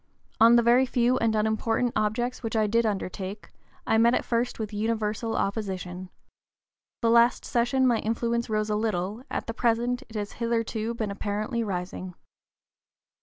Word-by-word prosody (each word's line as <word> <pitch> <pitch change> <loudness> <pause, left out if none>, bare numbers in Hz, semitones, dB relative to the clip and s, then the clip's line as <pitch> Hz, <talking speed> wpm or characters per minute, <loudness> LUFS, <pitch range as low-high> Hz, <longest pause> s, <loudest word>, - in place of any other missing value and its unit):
On 230 +1 +7
the 235 - +5
very 245 +3 +4
few 250 0 +2
and 225 -1 +1
unimportant 225 +2 0
objects 240 +4 -1
which 225 -2 -4
I 215 -1 +3
did 230 +2 +2
undertake, 195 0 -4 0.3
I 220 - +3
met 235 +2 +5
at - - -1
first 240 +1 -1
with 215 -1 -5
universal 220 +1 -1
opposition. 185 -3 -3 0.9
The 230 - +4
last 235 +2 +4
session 245 +1 +1
my 240 -3 +3
influence 235 +1 -1
rose 215 0 0
a - - +1
little, 210 0 -2
at - - -3
the 230 - -4
present 240 +2 0
it 220 - -13
has 205 -1 -3
hitherto 230 -1 -2
been 220 -3 -3
apparently 210 +3 -2
rising." 180 -2 -5
225 Hz, 160 wpm, -26 LUFS, 210-235 Hz, 0.9 s, On